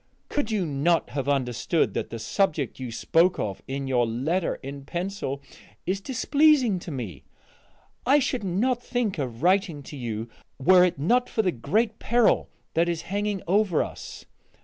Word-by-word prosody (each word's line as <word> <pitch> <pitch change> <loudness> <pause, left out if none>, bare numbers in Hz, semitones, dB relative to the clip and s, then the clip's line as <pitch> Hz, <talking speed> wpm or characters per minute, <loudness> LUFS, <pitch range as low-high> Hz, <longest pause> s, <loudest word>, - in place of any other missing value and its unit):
Could 290 -6 -1
you 210 -5 0
not 160 +3 +1
have 140 -1 -2
understood 130 -4 +1
that - - -3
the 115 - -5
subject 145 - -1
you 125 -2 -5
spoke 170 +9 +2
of 100 -2 -3
in 135 +1 -3
your 120 -3 +2
letter 155 +11 -1
in 140 +1 -7
pencil 175 -4 -4 0.4
is 190 +3 -1
displeasing 265 -2 +3
to 175 - -8
me? 115 - -6 0.8
I 275 +3 +5
should 255 -4 0
not 230 +7 0
think 240 -8 -2
of 125 -1 -4
writing 180 -5 +2
to 145 - -9
you 115 -4 -4 0.3
were 180 +6 +6
it 180 -4 +1
not 245 - +2
for 220 - 0
the 185 - +2
great 215 - 0
peril 235 0 +3 0.2
that 170 +1 +2
is 170 -2 -2
hanging 205 -1 -1
over 195 -2 +3
us. - - -9
175 Hz, 165 wpm, -26 LUFS, 135-210 Hz, 0.8 s, were